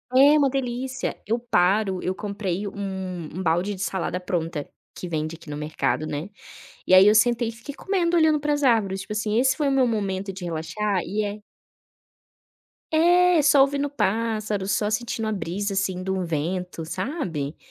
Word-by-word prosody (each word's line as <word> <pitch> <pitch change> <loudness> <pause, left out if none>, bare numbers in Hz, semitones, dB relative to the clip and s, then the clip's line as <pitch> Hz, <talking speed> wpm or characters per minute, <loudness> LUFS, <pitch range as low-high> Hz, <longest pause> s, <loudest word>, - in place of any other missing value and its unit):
É 285 +3 +7
uma 285 - +4
delícia. 255 0 -3
Eu 230 +3 +1
paro 195 -3 +1
eu 185 - 0
comprei 200 -1 -3
um 190 -4 -5
um 185 - -3
balde 175 +5 +1
de 190 - -8
salada 185 -1 -2
pronta 165 -4 -3 0.3
que 180 - -6
vende 155 0 -2
aqui 160 - -14
no 145 - -5
mercado, 155 0 -1
né, 150 +7 -4 0.6
e 185 - +3
aí 190 +2 +9
eu 210 - +6
sentei 235 +1 +3
e - - -4
fiquei 230 +6 -9
comendo, 350 -3 0
olhando 315 -2 +4
para 295 0 0
as 290 - -1
árvores, 200 -6 +2
tipo 210 - -6
assim, 215 +1 0
esse 260 +1 +2
foi 295 -2 +1
o - - +1
meu 265 -2 +3
momento 195 -3 -2
de 185 -1 -7
relaxar 180 +4 -2
e 210 +2 -2
é. 205 +1 -5 1.5
É, 350 0 +5
só 285 -1 +6
ouvindo 280 +1 0
pássaros, 215 -5 -1
só 210 +1 +1
sentindo 225 0 -2
a 215 - -1
brisa, 200 +1 -3
assim, 190 -1 -1
de 190 - -3
um 190 -1 -1
vento, 170 +2 -3
sabe. 170 - -4
205 Hz, 185 wpm, -24 LUFS, 185-250 Hz, 1.5 s, aí